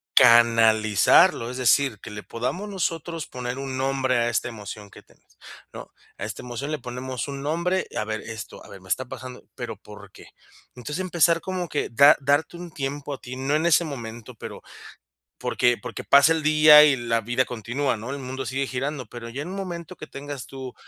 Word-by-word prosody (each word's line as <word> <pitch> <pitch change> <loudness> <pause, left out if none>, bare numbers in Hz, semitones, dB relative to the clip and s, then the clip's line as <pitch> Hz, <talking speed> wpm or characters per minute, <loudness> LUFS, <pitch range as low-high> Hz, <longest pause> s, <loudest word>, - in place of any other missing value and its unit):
canalizarlo, 115 -2 +5
es 125 - -7
decir, 130 -2 +2
que - - -9
le 105 0 -7
podamos 175 - -4
nosotros 165 -4 -3
poner 125 0 -5
un 135 -1 -5
nombre 130 -1 0
a 120 0 +1
esta 120 +1 -1
emoción 105 -2 -9
que - - -15
tienes, - - -28 0.4
¿no? - - -10 0.3
A 100 - -5
esta 105 -2 -6
emoción 125 +4 -5
le 155 - -2
ponemos 125 +1 -5
un 140 -1 -6
nombre: 170 +5 -1
"A - - 0
ver 110 0 -3
esto, 110 -2 -9
a - - -15
ver, 95 - -12
me 95 - -16
está 130 - 0
pasando, 125 0 -9
pero, 120 -4 -6
¿por 105 0 -14
qué?". - - -15 0.5
Entonces, 145 +7 -6
empezar, 170 -2 +2
como 185 -2 -4
que 145 - -2
da 140 +6 +6
darte 145 +5 +1
un 175 -1 -9
tiempo 145 0 -4
a 135 - -7
ti, 125 0 -8
no 135 +3 0
en 155 +2 +1
ese 170 +1 +4
momento, 115 -6 -8
pero - - -9 0.8
porque 120 0 +2
porque - - -7
pasa 140 +3 +6
el 160 -1 -2
día 155 0 +8
y 145 -2 +4
la 115 -1 0
vida 120 +3 0
continúa, 125 +3 -2
¿no?, 115 +5 -7
el 140 - -5
mundo 130 0 -5
sigue 135 +1 -2
girando. 130 0 -4
Pero 115 +1 -9
ya 130 +5 -5
en - - -8
un 190 - -6
momento 175 -4 -6
que - - -9
tengas 140 -2 -7
tú, 130 -2 -8
130 Hz, 205 wpm, -24 LUFS, 115-150 Hz, 0.8 s, día